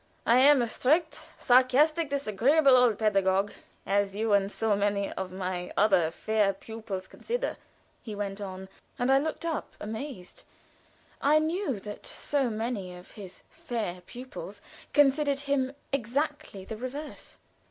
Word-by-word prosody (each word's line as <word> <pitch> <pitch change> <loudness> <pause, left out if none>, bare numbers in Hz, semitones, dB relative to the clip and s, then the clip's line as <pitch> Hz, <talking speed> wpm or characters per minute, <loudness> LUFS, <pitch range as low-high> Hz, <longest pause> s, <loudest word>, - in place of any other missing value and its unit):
"I 235 +2 +5
am 275 -1 +6
a - - -1
strict, 310 +8 0
sarcastic, 280 +5 +4
disagreeable 275 +2 +3
old 245 -4 +4
pedagogue, 195 -2 +2 0.3
as 200 0 +1
you 220 0 0
and 200 0 +3
so 220 -1 +1
many 200 0 0
of 190 -1 -5
my 185 -1 -4
other 190 -6 +4
fair 210 +3 +1
pupils 210 -2 -7
consider," - - -3 0.5
he 215 -3 -7
went 200 0 -4
on, 190 -1 -6 0.3
and 245 +2 +1
I 270 - +6
looked 315 +3 -3
up 325 -2 -3
in 210 - -6
amaze. 220 -5 -7 0.8
I 295 +2 +5
knew 315 - -1
that 205 0 -8
so 280 -4 -1
many 215 -5 -3
of 180 - -15
his 195 -4 -11
"fair 230 - -4
pupils" 255 - -9 0.3
considered 285 -1 +3
him 275 -2 0 0.2
exactly 270 -5 -2
the 220 - -6
reverse. 275 +6 -7
225 Hz, 140 wpm, -28 LUFS, 200-280 Hz, 0.8 s, am